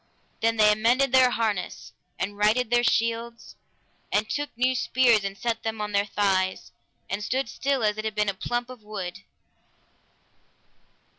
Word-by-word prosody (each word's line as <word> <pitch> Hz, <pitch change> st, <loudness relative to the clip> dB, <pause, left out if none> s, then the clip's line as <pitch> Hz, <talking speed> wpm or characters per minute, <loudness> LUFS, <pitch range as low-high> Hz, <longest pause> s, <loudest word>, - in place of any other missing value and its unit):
Then 230 Hz, 0 st, +1 dB
they 210 Hz, -1 st, +6 dB
amended 240 Hz, +5 st, +2 dB
their 260 Hz, -1 st, +6 dB
harness, 220 Hz, -6 st, -3 dB, 0.2 s
and 200 Hz, +2 st, -3 dB
righted 220 Hz, +3 st, +2 dB
their 240 Hz, 0 st, +3 dB
shields, 230 Hz, 0 st, -1 dB, 0.6 s
and 210 Hz, +1 st, +1 dB
took 290 Hz, +3 st, -3 dB
new 255 Hz, +1 st, +2 dB
spears 245 Hz, -4 st, +3 dB
and 195 Hz, 0 st, -4 dB
set 230 Hz, 0 st, -2 dB
them 225 Hz, -1 st, -4 dB
on 210 Hz, 0 st, -3 dB
their 200 Hz, 0 st, +1 dB
thighs, 190 Hz, -2 st, 0 dB, 0.4 s
and 200 Hz, +2 st, -3 dB
stood 260 Hz, +5 st, -1 dB
still 270 Hz, +1 st, -1 dB
as 210 Hz, 0 st, +1 dB
it 215 Hz, -, -4 dB
had 215 Hz, -1 st, -3 dB
been 210 Hz, -1 st, +1 dB
a 200 Hz, -, +1 dB
plump 240 Hz, +5 st, -3 dB
of 250 Hz, -3 st, -12 dB
wood. 200 Hz, -4 st, -6 dB
220 Hz, 160 wpm, -25 LUFS, 210-240 Hz, 0.6 s, they